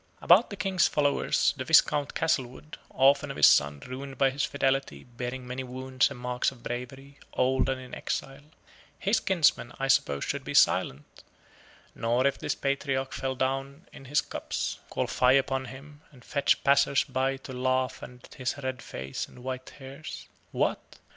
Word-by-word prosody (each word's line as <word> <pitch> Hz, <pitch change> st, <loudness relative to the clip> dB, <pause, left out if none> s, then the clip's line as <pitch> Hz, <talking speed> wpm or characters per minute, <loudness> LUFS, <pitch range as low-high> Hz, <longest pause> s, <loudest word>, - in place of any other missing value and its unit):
About 190 Hz, +8 st, +5 dB
the 200 Hz, -, -6 dB
King's 190 Hz, -2 st, +2 dB
follower, 145 Hz, -1 st, 0 dB, 0.3 s
the 130 Hz, -, -3 dB
Viscount 145 Hz, 0 st, +3 dB
Castlewood 150 Hz, -1 st, -2 dB
orphan 135 Hz, +2 st, +3 dB
of -, -, -6 dB
his 75 Hz, -, +7 dB
son, 70 Hz, 0 st, +4 dB
ruined 135 Hz, +2 st, -8 dB
by 135 Hz, -1 st, +3 dB
his 135 Hz, +1 st, -2 dB
fidelity, 135 Hz, -, -1 dB
bearing 125 Hz, +1 st, -6 dB
many 125 Hz, +1 st, -5 dB
wounds 130 Hz, 0 st, 0 dB
and 140 Hz, -3 st, -9 dB
marks 125 Hz, 0 st, 0 dB
of 130 Hz, -3 st, -15 dB
bravery, 135 Hz, +3 st, -7 dB
old 130 Hz, 0 st, +1 dB
and 130 Hz, -1 st, -1 dB
in 130 Hz, -1 st, -12 dB
exile 135 Hz, +2 st, -4 dB, 0.5 s
his 205 Hz, +3 st, +1 dB
kinsmen 160 Hz, -, +2 dB
I 135 Hz, -, -1 dB
suppose 70 Hz, -, +2 dB
should -, -, -3 dB
be -, -, -5 dB
silent; 70 Hz, +3 st, +2 dB, 0.7 s
nor 120 Hz, +3 st, 0 dB
if 140 Hz, -, +1 dB
this -, -, -2 dB
patriarch 135 Hz, -1 st, -2 dB
fell 135 Hz, 0 st, -3 dB
down 135 Hz, +5 st, -3 dB
in 135 Hz, -, -12 dB
his 145 Hz, +2 st, +2 dB
cups, -, -, -4 dB
call -, -, -1 dB
fie 125 Hz, 0 st, +3 dB
upon 135 Hz, -1 st, -1 dB
him, 145 Hz, +4 st, -12 dB
and 125 Hz, -4 st, -18 dB
fetch 140 Hz, -2 st, +1 dB
passers 140 Hz, 0 st, +4 dB
by 135 Hz, +1 st, -1 dB
to 135 Hz, 0 st, -10 dB
laugh 130 Hz, 0 st, -1 dB
at 125 Hz, 0 st, -12 dB
his 130 Hz, +2 st, -3 dB
red 130 Hz, -2 st, -4 dB
face 65 Hz, +1 st, -6 dB
and 125 Hz, -, -15 dB
white 130 Hz, 0 st, -5 dB
hairs. 135 Hz, +2 st, -9 dB, 0.2 s
What! -, -, -2 dB
130 Hz, 170 wpm, -28 LUFS, 125-140 Hz, 0.7 s, his